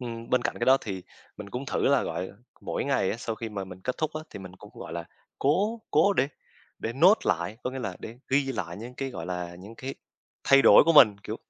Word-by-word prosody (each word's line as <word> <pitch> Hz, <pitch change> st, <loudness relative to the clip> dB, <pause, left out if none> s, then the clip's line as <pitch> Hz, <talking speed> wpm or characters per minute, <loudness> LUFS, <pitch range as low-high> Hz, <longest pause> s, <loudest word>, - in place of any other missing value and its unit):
ừm, 115 Hz, -2 st, -7 dB
bên 125 Hz, -1 st, +3 dB
cạnh -, -, -2 dB
cái 120 Hz, -, 0 dB
đó 130 Hz, +1 st, +7 dB
thì, 95 Hz, -3 st, -6 dB, 0.3 s
mình 105 Hz, -1 st, -9 dB
cũng 125 Hz, +5 st, -5 dB
thử -, -, -2 dB
là 140 Hz, -2 st, +3 dB
gọi 85 Hz, +3 st, -4 dB, 0.3 s
mỗi -, -, -3 dB
ngày 135 Hz, -9 st, +1 dB
á, -, -, -3 dB
sau 115 Hz, -1 st, -4 dB
khi 115 Hz, +1 st, -6 dB
mà 100 Hz, -2 st, -5 dB
mình 95 Hz, -1 st, -11 dB
kết 125 Hz, -, -1 dB
thúc 155 Hz, -1 st, -1 dB
á, 155 Hz, -, -4 dB
thì -, -, -8 dB
mình 95 Hz, -2 st, -10 dB
cũng, 105 Hz, -, -13 dB
gọi 80 Hz, -, -8 dB
là, 85 Hz, 0 st, -4 dB, 0.3 s
cố 205 Hz, +11 st, +1 dB
cố 180 Hz, +7 st, +4 dB
để 135 Hz, -6 st, +1 dB, 0.5 s
để 115 Hz, -, -3 dB
note 180 Hz, -, +5 dB
lạ, 85 Hz, 0 st, 0 dB
có 125 Hz, -, -1 dB
nghĩa 130 Hz, -, -6 dB
là 110 Hz, -, -4 dB
để 115 Hz, +2 st, -9 dB
ghi 140 Hz, +1 st, +2 dB
lại 85 Hz, -7 st, -5 dB
những 120 Hz, +4 st, -9 dB
cái, 135 Hz, +1 st, -4 dB
gọi 80 Hz, -9 st, -7 dB
là, 90 Hz, -1 st, -4 dB
những 100 Hz, +5 st, -11 dB
cái 130 Hz, +3 st, -6 dB, 0.5 s
thay 135 Hz, 0 st, +6 dB
đổi -, -, +8 dB
của 165 Hz, -, +4 dB
mình, 110 Hz, -9 st, +7 dB
kiểu, -, -, -4 dB
115 Hz, 255 wpm, -27 LUFS, 95-135 Hz, 0.5 s, đổi